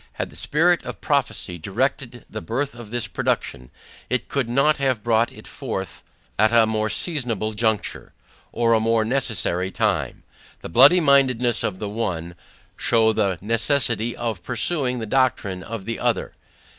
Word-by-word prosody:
Had - - -4
the - - -16
spirit 170 +4 +2
of - - -7
prophecy 135 - -1
directed 120 - -2
the 110 - -7
birth 135 +5 -2
of 120 -3 -11
this 120 0 -2
production, 65 -9 -2 0.4
it 125 - -1
could 135 -4 -1
not 140 +5 +3
have 130 -6 0
brought 115 0 +2
it - - -14
forth, - - -5 0.4
at 110 +1 +4
a 115 -1 +5
more 110 0 -1
seasonable 115 - -1
juncture, 110 -1 -1 0.4
or 115 -1 +2
a 110 - +4
more 110 0 +2
necessary 110 -8 0
time. - - -1 0.4
The - - -7
bloody 140 - +7
mindedness 130 -5 +3
of 95 - -2
the 105 - -4
one, 90 -6 -3 0.4
shew 110 -2 +2
the 95 -4 0
necessity 115 +1 +1
of 115 -6 -3
pursuing 125 - -1
the 115 - -4
doctrine 110 -6 0
of 110 -1 -7
the 115 +1 -4
other. - - 0
115 Hz, 155 wpm, -22 LUFS, 110-130 Hz, 0.4 s, bloody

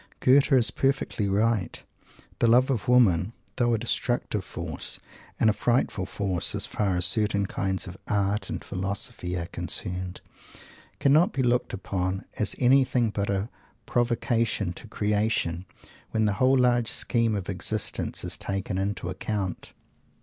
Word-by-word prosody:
Goethe 135 +3 +5
is 125 -4 +4
perfectly 135 -6 0
right. 105 -2 0 0.6
The 115 - +4
"love 125 +4 +5
of 120 -6 -2
women," 110 -6 +4 0.2
though 120 -1 +3
a - - 0
destructive 115 -2 -1
force, 85 -4 -3 0.4
and - - +4
a 110 - +5
frightful 115 -3 0
force 95 -4 -2
as - - +2
far 100 -3 -1
as 90 0 +1
certain 100 +1 +1
kinds 95 -2 -2
of 90 0 -9
"art" 100 0 0
and - - -4
"philosophy" 95 -2 -3
are 85 - -3
concerned, 90 +1 -5 0.8
cannot 155 +9 +4
be 130 - 0
looked 125 0 +1
upon 95 0 -3
as 105 - +1
anything 125 -3 +3
but 100 -1 -2
"a 100 +2 -1 0.4
provocation 115 -5 0
to 110 - -10
creation," 105 -5 0 0.4
when 110 -1 +1
the 105 - +2
whole 130 +1 +5
large 120 -2 +3
scheme 115 -2 +1
of 95 -3 -4
existence 100 +2 -3
is - - -4
taken 95 -1 -3
into 100 -2 -2
account. 95 0 -3
105 Hz, 145 wpm, -26 LUFS, 95-120 Hz, 0.8 s, Goethe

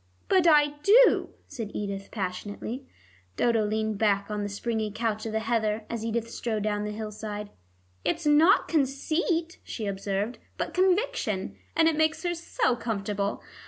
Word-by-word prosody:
"But 370 -3 +4
I 295 -2 +5
do," 460 +9 +6 0.2
said 230 -7 -6
Edith 200 -1 -4
passionately. 205 +6 -5 0.5
Dodo 230 -2 +2
leaned 215 -1 -1
back 200 -1 +2
on 210 0 -2
the 205 - -2
springy 220 +1 -2
couch 220 0 -2
of - - -4
the 220 0 -1
heather 220 -1 0
as 230 -2 -3
Edith 230 0 -1
strode 220 -3 -2
down 210 -1 -1
the 210 - -3
hillside. 210 -1 -6 0.5
"It's 335 0 -1
not 305 +6 +5
conceit," 320 +4 0
she 220 - -5
observed, 200 +3 -2 0.2
"but - - -3
conviction, 365 - +1 0.2
and 325 - +5
it 325 - +3
makes 315 +2 +1
her 350 -1 0
so 330 -7 0
comfortable. 205 -3 -2
225 Hz, 155 wpm, -27 LUFS, 210-300 Hz, 0.5 s, do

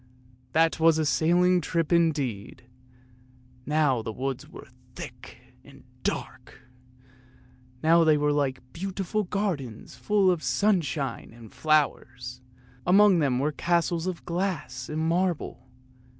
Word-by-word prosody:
That 165 0 +3
was 160 0 +5
a 160 - +1
sailing 175 +5 +3
trip 165 -1 -1
indeed! 145 -14 0 1.0
Now 150 -5 +2
the 110 - -5
woods 130 +3 -4
were - - -11 0.3
thick - - -10 0.3
and - - -16 0.2
dark, - - -5 1.2
now 165 +1 +5
they 155 -2 +4
were 150 0 +1
like 130 -3 -2
beautiful 195 +3 -3
gardens 175 - -3
full 200 -3 +2
of 175 -3 -1
sunshine 155 - 0
and 115 -3 -14
flowers, 130 -5 0 0.4
and 180 - +3
among 205 -3 +6
them 135 -5 +1
were 145 +4 0
castles 170 +2 0
of 185 -2 -5
glass 170 -8 -3
and 155 +1 -2
marble. 170 -7 -1
160 Hz, 120 wpm, -26 LUFS, 135-180 Hz, 1.2 s, among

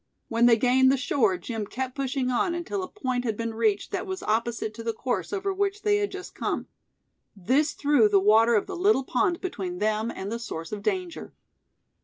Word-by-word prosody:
When 230 +1 +4
they 230 -1 +6
gained 260 +2 +4
the 275 - +2
shore 225 -7 +1
Jim 215 +3 -5
kept 255 +2 -4
pushing 265 -1 -1
on 340 +8 +1
until 345 +3 -3
a 370 - -4
point 255 -11 -3
had 220 -4 -2
been 230 0 -3
reached 220 -2 0
that - - -3
was 375 -1 -5
opposite 225 0 -1
to 230 +1 -8
the 230 0 -1
course 250 +2 -2
over 395 -1 -1
which 400 +1 -1
they 415 -1 +3
had 410 0 0
just 385 -1 -8
come. - - -2 0.7
This 260 - +1
threw 285 -7 +3
the 200 -1 +5
water 220 +4 +5
of 210 - +2
the 385 - -6
little 365 -5 +3
pond 345 +7 0
between 190 - -4
them 215 +3 0
and 200 -2 -5
the 230 - -3
source 165 -8 -6
of 210 -1 -4
danger. 365 - -3
245 Hz, 210 wpm, -26 LUFS, 220-345 Hz, 0.7 s, they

